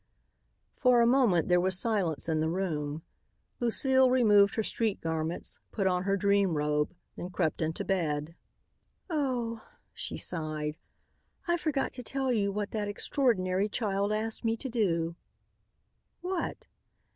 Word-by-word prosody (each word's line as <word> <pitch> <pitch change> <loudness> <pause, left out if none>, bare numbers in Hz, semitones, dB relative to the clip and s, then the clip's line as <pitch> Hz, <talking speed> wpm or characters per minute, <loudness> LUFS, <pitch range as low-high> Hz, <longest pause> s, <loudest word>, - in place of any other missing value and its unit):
For 250 -2 +4
a 235 - +5
moment 235 - +3
there 180 0 +4
was 185 0 +2
silence 195 -9 0
in 160 -1 +1
the 160 +1 +1
room. 160 -4 -2 0.6
Lucile 260 +2 +4
removed 210 -6 +5
her 220 - 0
street 220 -1 -1
garments, 160 +1 -3
put 200 - -1
on 180 -1 +1
her 200 0 +2
dream 200 -4 +2
robe, 150 +2 0 0.2
then 180 - -6
crept 160 -3 -1
into 160 0 -1
bed. 160 -4 -1 0.8
"Oh," 245 -7 -1 0.3
she - - -5
sighed, 155 -2 -3 0.7
"I 345 - +3
forgot 305 -5 -1
to 250 - -7
tell 265 +2 -1
you 205 -4 +1
what 205 0 -3
that 210 -2 -2
extraordinary 205 -4 +1
child 200 -2 -1
asked 220 +2 -2
me 225 0 +1
to 265 - -4
do." 170 -8 0 1.0
"What?" 360 -1 -3
200 Hz, 140 wpm, -30 LUFS, 165-235 Hz, 1.0 s, a